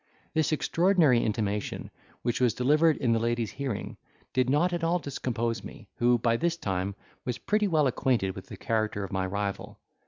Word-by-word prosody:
This 160 -1 +1
extraordinary 165 -5 +3
intimation, 105 -2 -2 0.3
which 120 +1 0
was 120 -3 +3
delivered 150 +5 +4
in 125 -5 +1
the 115 - +2
lady's 115 -1 -1
hearing, 135 -7 -4 0.4
did 130 -1 +2
not 160 +6 +2
at 170 -1 -2
all 170 +2 +3
discompose 120 -6 -2
me, - - -11
who, 120 0 +4
by 115 0 +1
this 170 +5 0
time, 95 - -2 0.3
was 125 -1 -2
pretty 210 0 +1
well 155 -5 +3
acquainted 120 -6 +1
with - - -9
the 105 -7 -9
character 110 -1 -1
of 95 - -6
my 95 0 0
rival. 100 +1 -3
120 Hz, 180 wpm, -28 LUFS, 110-150 Hz, 0.4 s, delivered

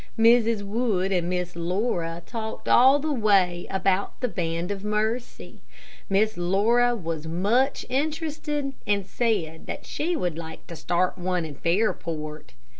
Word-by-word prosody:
Mrs. 230 -1 +4
Wood 200 -3 0
and 175 -2 +1
Miss 180 -1 -2
Laura 170 -1 -1
talked 220 -2 -6
all 265 +3 +7
the 300 +1 -1
way 195 -7 +2
about 195 0 0
the 250 - 0
Band 170 -3 -2
of 200 -1 -4
Mercy. 215 +3 -2 0.5
Miss 215 +3 +2
Laura 225 +7 +3
was 165 -6 -4
much 210 - +1
interested, 295 0 -2
and 200 -2 +1
said 190 -8 -1
that - - -6
she 340 +4 -2
would 175 - -2
like 160 -1 -8
to 170 - -8
start 175 +4 0
one 180 -1 -1
in 155 - -7
Fairport. 160 -3 -2
200 Hz, 140 wpm, -25 LUFS, 175-235 Hz, 0.5 s, all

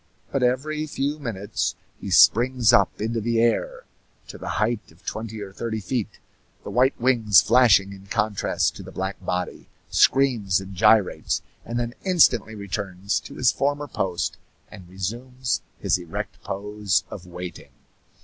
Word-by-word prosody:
But 135 - 0
every 150 +5 0
few 145 +1 -2
minutes 110 -4 -3 0.2
he - - -6
springs 120 0 +5
up - - +3
into 115 +2 -1
the 115 +1 0
air 485 - +1 0.5
to - - -9
the - - -6
height 120 -7 -1
of 80 - -23
twenty 110 0 -5
or 95 -1 -8
thirty 110 +1 -3
feet, 115 +1 -3 0.5
the - - -7
white 130 +3 +2
wings 115 -6 +5
flashing 105 -5 +5
in 100 0 -13
contrast 105 -1 0
to - - -8
the - - -10
black 95 0 -4
body, 90 0 -3 0.2
screams 120 -9 +3
and 95 0 -9
gyrates, 105 0 +3 0.2
and 120 +1 -3
then 120 0 -3
instantly 130 - +3
returns 100 -1 -3
to - - -11
his 125 -1 +3
former 145 +1 -1
post 85 - -2 0.3
and 95 -4 -12
resumes 120 +7 -3 0.2
his - - +1
erect 85 -2 -6
pose 100 -1 -1
of 90 -2 -8
waiting. 90 0 -8
110 Hz, 150 wpm, -24 LUFS, 95-125 Hz, 0.5 s, springs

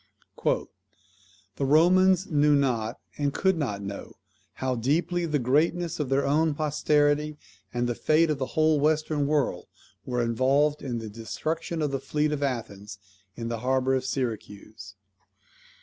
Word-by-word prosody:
"The - - +1 0.9
Romans 180 +6 +4
knew 150 -2 +3
not, 120 -5 0 0.2
and 145 -1 +1
could 190 +5 +1
not 105 -11 -3
know, 100 0 -7 0.4
how 130 -1 -2
deeply 170 +8 0
the 150 -2 +1
greatness 155 +7 +1
of 145 -4 -2
their 135 +1 +1
own 150 +2 +2
posterity, 150 0 +1 0.3
and 120 0 -1
the 120 - 0
fate 155 +6 +2
of 145 - -2
the 130 - -2
whole 155 -1 +4
Western 155 -1 +1
world, 150 -2 0 0.4
were 125 -1 -1
involved 135 +6 +2
in 125 -3 -3
the 115 -1 -6
destruction 155 +10 -4
of 145 - -1
the 135 - -1
fleet 150 +2 -1
of 150 -1 -2
Athens 110 -6 -4 0.4
in 115 -1 -5
the 115 -1 -3
harbour 130 +2 +1
of 130 -1 0
Syracuse. 110 -5 -5
140 Hz, 150 wpm, -26 LUFS, 120-155 Hz, 0.9 s, Romans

